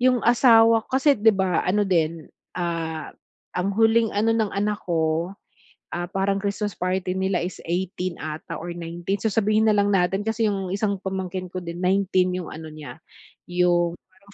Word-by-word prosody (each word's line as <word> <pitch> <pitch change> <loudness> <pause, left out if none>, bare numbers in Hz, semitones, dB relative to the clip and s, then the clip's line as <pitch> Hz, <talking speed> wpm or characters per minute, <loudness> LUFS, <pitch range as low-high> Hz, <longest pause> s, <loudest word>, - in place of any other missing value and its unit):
'yong 250 -1 +3
asawa 230 -2 +5
kasi, 275 +2 +3
'di 220 +1 +5
ba, 190 -3 +1
ano 205 +3 +2
din, 165 -3 0 0.3
ah, 165 -3 -3 0.4
ang 185 +2 0
huling 225 0 +3
ano 215 +3 +2
ng 220 -3 0
anak 205 +1 -1
ko, 165 +1 0 0.6
ah, 175 0 -3
parang 195 +1 0
Christmas 205 +1 -2
party 185 0 -1
nila 190 -2 0
is 180 -1 -5
18 180 0 -2
'ata 155 0 -6
or 175 - -6
19, 175 +3 -4
so 220 - 0
sabihin 215 +1 +2
na 215 - +4
lang 205 0 +2
natin 195 +1 +1
kasi 220 +1 0
'yong 195 -3 -2
isang 200 +1 0
pamangkin 190 -1 -4
ko 185 - -4
din 170 0 -6
19 185 -1 +2
'yong 180 -3 -4
ano 160 0 -8
niya, 155 0 -10 0.5
'yong 175 -1 +2
parang 200 +2 -23
190 Hz, 170 wpm, -24 LUFS, 175-210 Hz, 0.6 s, asawa